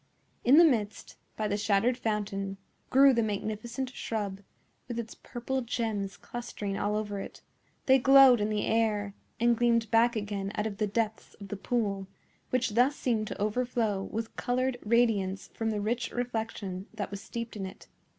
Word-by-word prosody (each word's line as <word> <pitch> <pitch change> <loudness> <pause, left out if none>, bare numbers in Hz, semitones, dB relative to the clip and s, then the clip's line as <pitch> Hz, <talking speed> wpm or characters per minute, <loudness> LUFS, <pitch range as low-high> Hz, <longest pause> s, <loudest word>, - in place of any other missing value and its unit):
In 265 +5 +6
the 340 - +9
midst, 220 -8 0 0.2
by 215 - 0
the 205 0 0
shattered 210 +4 +2
fountain, 200 -4 -2 0.3
grew 275 +1 +7
the 235 - +2
magnificent 220 +4 -3
shrub, 205 -5 -3 0.5
with 240 -2 -5
its 230 -1 -4
purple 260 +2 -4
gems 220 -5 -2
clustering 205 -2 -5
all 205 +1 0
over 205 -2 -2
it; - - -9 0.4
they 265 0 +6
glowed 265 -2 +7
in 210 - +1
the 210 -1 0
air, 210 -3 +1 0.3
and 235 0 +4
gleamed 230 -2 +2
back 235 +1 +4
again 205 -2 -3
out 210 - -1
of 210 -2 -4
the 210 - 0
depths 220 +1 -2
of 200 -2 -11
the 205 - -3
pool, 200 -2 -1 0.4
which 255 -2 +1
thus 250 +6 +3
seemed 225 -6 0
to - - -6
overflow 215 -1 0
with 225 0 -5
colored 250 0 -1
radiance 210 -4 +1
from 225 -1 -2
the 215 -1 -1
rich 230 +3 -1
reflection 220 -5 -4
that 205 -2 -4
was 200 -1 -6
steeped 230 0 -6
in 195 -2 -4
it. 190 - -12
220 Hz, 170 wpm, -29 LUFS, 205-240 Hz, 0.5 s, the